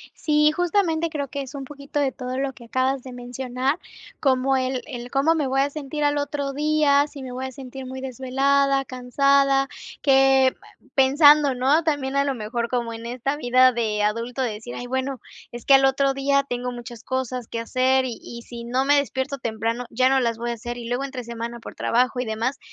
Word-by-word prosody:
Sí, 300 0 +3
justamente 335 -2 +1
creo 285 -4 -4
que 280 +1 -5
es 270 +1 -7
un 275 -1 -5
poquito 280 +1 -6
de 275 -2 +1
todo 255 0 -5
lo 270 0 -1
que 240 - -14
acabas 260 +2 0
de 255 - -9
mencionar, 250 +4 -2 0.4
como 265 -1 +2
el 255 -1 -1
el 245 -3 -7
cómo 285 +4 +3
me 300 -4 0
voy 270 +1 +1
a 285 - 0
sentir 295 0 -4
al 290 0 +2
otro 285 -1 -2
día, 295 -1 +3
si 285 -2 -10
me 255 -1 -7
voy 260 +1 -4
a 260 - -7
sentir 265 0 -9
muy 260 +1 -6
desvelada, 270 +2 +1
cansada, 275 +2 +2 0.3
que 270 -1 +5 0.4
pensando, 290 +1 +6
¿no? 275 +6 +3
También 280 -3 -1
a 280 - +3
lo 275 -2 -1
mejor 235 +1 -3
como 235 -2 -2
en 230 +1 -7
esta 255 +4 -2
vida 255 -1 +4
de 220 -3 -1
adulto 230 +5 -1
de 235 -4 -1
decir: 220 +3 -8
"Ay, 245 - -6
bueno, 260 +1 -2 0.3
es 240 -1 -8
que - - +4
al 270 0 +6
otro 275 0 +2
día 275 +1 +1
tengo 245 0 -3
muchas 240 -1 -9
cosas 255 -2 -3
que 230 - -4
hacer, 260 +2 +2
y 240 -3 -4
y 235 0 -9
si 235 -1 -9
no 255 +3 0
me 290 +1 +4
despierto 280 0 -1
temprano 230 +1 -2
ya 255 +2 +3
no 270 0 +3
las 230 -2 0
voy 235 +1 -3
a 235 - -1
hacer 240 +1 -6
y 235 -1 -7
luego 245 +3 -1
entre 260 -3 -6
semana 235 0 -6
por - - -10
trabajo 250 +1 +1
y - - -1
demás, 225 +5 -2
260 Hz, 215 wpm, -23 LUFS, 245-280 Hz, 0.4 s, pensando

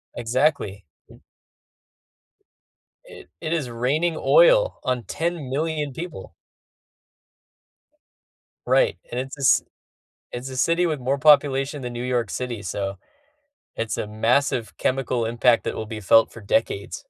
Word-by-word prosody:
Exactly. 120 - 0 2.2
It - - -14
it 160 +1 -2
is 140 -8 -2
raining 150 +8 0
oil - - +4
on 125 -2 -2
10,000,000 155 -2 -2
people. 165 - -8 2.3
Right, - - +3
and 125 - -2
it's 135 +2 -6
a 140 - -6
ci - - +5 0.7
it's 125 +2 -6
a 130 - -7
city 170 +6 +2
with 155 -5 -2
more 135 +3 -1
population 145 -1 +3
than 125 0 -5
New 120 +1 -5
York 120 -4 -1
City, 120 -5 -4
so, 95 0 -4 0.8
it's 115 -1 -2
a 105 - -3
massive 115 +1 0
chemical 125 -3 -1
impact 120 +1 +2
that - - -3
will 110 - -4
be 110 0 -7
felt 110 +3 +4
for 115 - -12
decades. 100 0 -1
130 Hz, 125 wpm, -23 LUFS, 115-150 Hz, 2.3 s, ci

